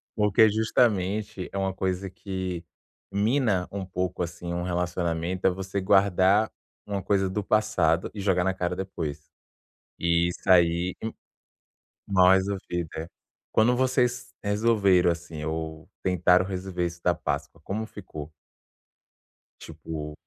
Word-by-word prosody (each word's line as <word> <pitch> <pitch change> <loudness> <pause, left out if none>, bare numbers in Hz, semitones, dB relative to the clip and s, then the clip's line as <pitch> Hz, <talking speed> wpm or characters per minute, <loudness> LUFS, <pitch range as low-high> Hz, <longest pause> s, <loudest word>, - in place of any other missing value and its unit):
Porque 105 0 +5
justamente 105 -3 0
é 100 - -5
uma 95 -1 0
coisa 95 0 -2
que 95 -2 -5 0.5
mina 105 -2 +1
um 100 -1 -4
pouco 90 0 -2
assim 85 0 -5
um 85 - -2
relacionamento 90 0 -2
é - - +6
você 95 +1 -3
guardar 100 +1 +4 0.3
uma 100 -1 -3
coisa 95 0 +1
do 105 +2 -2
passado 95 -6 +2
e 105 - -6
jogar 95 -2 +2
na 95 +1 +1
cara 90 -1 -2
depois. 80 -6 -5 0.7
E 85 0 +3
isso - - -6
ai 85 0 +4
um 110 - -2 1.0
mal 95 -2 +5
resolvida. 95 -4 -1 0.4
Quando 120 +3 +4
vocês 125 -1 +1
resolveram, 100 -4 +3
assim, 85 -2 -6
ou 80 0 -5
tentaram 90 0 +4
resolver 90 -2 -3
isso 85 0 -5
da 90 - +3
Páscoa, 80 -1 -4
como 110 +6 -3
ficou? 80 -8 -9 1.3
Tipo, 75 -2 -7
95 Hz, 125 wpm, -26 LUFS, 85-100 Hz, 1.3 s, é